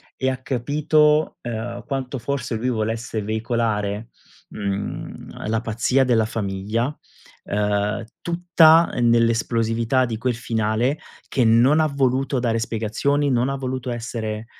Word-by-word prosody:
e 130 - 0
ha 130 - -2
capito, 150 +4 +2
ehm, 120 0 -5
quanto 135 -1 -3
forse 130 0 -3
lui 120 +3 -1
volesse 115 -1 -2
veicolare, 110 -1 -1 0.4
mhmm, 100 +1 -5
la 110 0 +1
pazzia 120 +4 +1
della 115 -3 +3
famiglia, 110 +5 -2 0.5
ehm, 105 +2 -1 0.2
tutta, 170 -1 +5
ehm, 120 -1 +2
nell'esplosività 115 +1 +2
di 115 -2 -4
quel 125 +2 -1
finale 115 +3 0 0.3
che 130 - +1
non 120 +7 +5
ha 155 - +3
voluto 135 -1 0
dare 115 -2 0
spiegazioni, 115 +6 0
non 125 0 +1
ha 135 - -1
voluto 130 -2 -4
essere, 115 -2 -4
120 Hz, 125 wpm, -22 LUFS, 110-135 Hz, 0.5 s, tutta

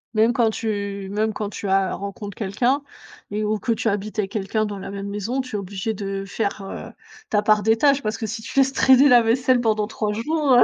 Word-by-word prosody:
Même 225 +2 +4
quand 230 -1 +3
tu 200 -3 -3
même 215 +2 0
quand 210 -1 -3
tu 205 - -6
as 190 -1 +2
rencontres 200 0 -6
quelqu'un, 240 +7 0 0.5
et 210 +1 -2
ou 210 0 0
que 235 - -1
tu 225 - -2
habites 205 +1 -3
avec 195 -2 -1
quelqu'un 215 +1 -1
dans 205 -2 -5
la - - -7
même 200 0 -5
maison, 210 +6 -2
tu 255 -4 -7
es - - 0
obligé 200 +3 -3
de 195 -1 -4
faire, 200 0 -2
heu, 195 - -7 0.4
ta 210 - +2
part 210 0 +4
des 220 +2 +3
tâches. 280 +2 +4
Parce 215 -2 -2
que 225 - -4
si 220 +1 -5
tu 225 - -9
laisses 270 0 +3
traîner 265 +1 +6
la 245 -2 +7
vaisselle 245 +2 +2
pendant 215 -2 +1
3 215 -1 -2
jours, 290 +5 +1
heu, 245 - +8
215 Hz, 235 wpm, -22 LUFS, 200-235 Hz, 0.5 s, heu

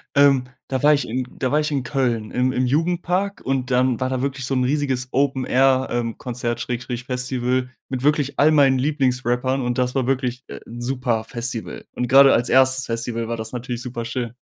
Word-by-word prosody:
Ähm, 140 -2 +5 0.2
da 130 -2 -2
war 150 +1 +5
ich 140 - -3
in 125 +2 -3
da 130 0 -1
war 150 - +3
ich 150 - 0
in 140 -3 -1
Köln 120 -5 -1
im 125 +1 +1
im 130 0 0
Jugendpark 175 +7 0
und 130 -1 -1
dann 125 -1 +2
war 130 0 -1
da 130 0 -2
wirklich 135 -2 -3
so 135 - -1
'n 125 - +2
riesiges 130 -2 0
Open-Air 130 -1 +2
ähm, 120 -2 -2
Konzert/Festival 125 +1 -3 0.2
mit 130 -2 -3
wirklich 145 -1 +1
all 150 +2 +6
meinen 140 -4 +4
Lieblingsrappern 130 -2 0
und 120 0 -2
das 125 0 0
war 130 -3 0
wirklich, 130 -1 -1
äh, - - -8
'n, 120 +1 -9
super 125 -3 -1
Festival. 120 -1 -5
Und 125 - -2
grade 135 +1 +7
als 120 - +1
1. 130 0 +3
Festival 115 0 -3
war 115 0 -3
das 110 0 -6
natürlich 125 0 -5
super 120 -2 -5
schön. 115 0 -4
130 Hz, 195 wpm, -22 LUFS, 120-135 Hz, 0.2 s, grade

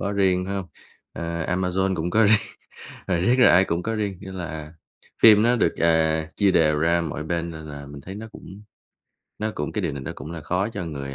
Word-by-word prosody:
có 100 - -2
riêng, 95 -2 +2
phải 100 - -3
hông? 95 -2 -4 0.5
Ờ, 85 -1 -4
Amazon 95 +1 0
cũng 85 +2 -2
có 110 +5 +4
riêng, 110 +1 +6 0.7
ờ, 95 - +1
riết 120 +8 +3
là 125 - +7
ai 95 +2 +6
cũng 85 0 -2
có 115 +3 -2
riêng, 100 -4 -3
như 95 -1 -9
là 80 -3 -7 0.5
phim 105 -2 +8
nó 120 +2 +3
được, - - +1
à, 80 -1 +2
chia 100 -2 +3
đều 75 -4 +3
ra 85 +1 +2
mọi 75 -2 -4
bên, 85 +1 -2
nên 80 -1 -9
là 70 -1 -8
mình 70 0 -10
thấy 95 +7 -9
nó 110 +2 -8
cũng 100 +2 -12 0.8
nó 110 0 -2
cũng 75 - -4
cái 105 - -2
điều 85 -4 -1
này 70 -1 -6
nó - - -5
cũng 75 +5 -8
đã 85 - -6
khó 90 +6 -1
cho 100 -5 -5
người, 70 -3 -6
90 Hz, 235 wpm, -24 LUFS, 80-100 Hz, 0.8 s, phim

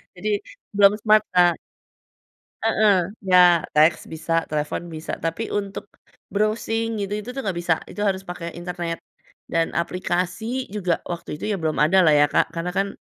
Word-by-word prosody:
Jadi 205 +4 -3 0.5
belum 200 0 +7
smart 215 -1 +5
Kak. 175 -1 +4 1.1
Heeh, 215 -1 +3 0.4
ya 180 -2 +7
teks 155 +2 +3
bisa, 165 +1 -1
telefon 155 +3 -3
bisa 160 -1 -6
tapi 165 +7 -3
untuk, 200 -1 -3 0.5
browsing 225 +1 0
gitu 200 0 -3
itu 250 - -9
tuh 270 - -6
enggak 195 -8 -2
bisa 170 -1 +2
itu 205 - -7
harus 195 -1 0
pakai 170 -1 -6
internet, 175 -1 -4 0.5
dan 165 0 0
aplikasi 185 +8 -2
juga 180 -5 0
waktu 170 -3 -5
itu - - -5
ya - - 0
belum 155 -1 -1
ada 180 +6 +5
lah 155 - +5
ya 145 - +6
Kak - - +1
karena 170 +1 -3
kan, 195 0 +1
180 Hz, 160 wpm, -23 LUFS, 165-205 Hz, 1.1 s, belum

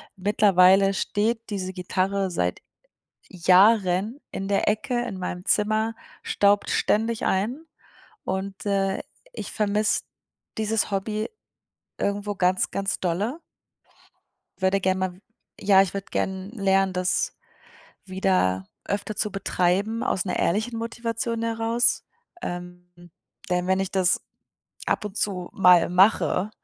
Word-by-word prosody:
Mittlerweile 195 -1 +4
steht 225 +4 -1
diese 190 -3 -3
Gitarre 190 +1 -1
seit 90 - -1 0.7
Jahren 190 +4 +3
in 195 - -4
der 200 0 +1
Ecke 240 +3 -1
in 205 -6 -5
meinem 180 -1 -5
Zimmer, 215 +2 +1 0.3
staubt 205 0 +2
ständig 225 +1 +1
ein 235 +12 -1 0.6
und, 190 +1 -4
äh, 195 -1 0 0.3
ich - - -7
vermisse 210 0 +1 0.6
dieses 220 0 0
Hobby 210 +2 -2 0.7
irgendwo 205 +1 -2
ganz, 185 -1 +1
ganz 195 0 -2
dolle. 200 - -1 1.2
Würde 190 +1 +2
gerne 190 0 +1
ma 180 - -13 0.5
ja, 195 -1 +5
ich 195 - -1
würde 200 0 -4
gerne 190 0 -2
lernen, 195 -3 +2
das 180 +1 0 0.7
wieder 185 - +1 0.2
öfter 205 +1 -3
zu 210 - -1
betreiben, 195 +3 0
aus 185 - 0
'ner 185 - -2
ehrlichen 220 +6 0
Motivation 230 0 -3
heraus. 230 +1 +1 0.4
Ähm, 180 0 -7 0.6
denn 180 0 +1
wenn 190 +1 +2
ich 195 - -2
das 190 -1 +2 0.7
ab - - 0
und 210 0 -6
zu 185 -3 -2
mal 180 -3 +5
mache 190 +2 +3
195 Hz, 120 wpm, -25 LUFS, 185-215 Hz, 1.2 s, ja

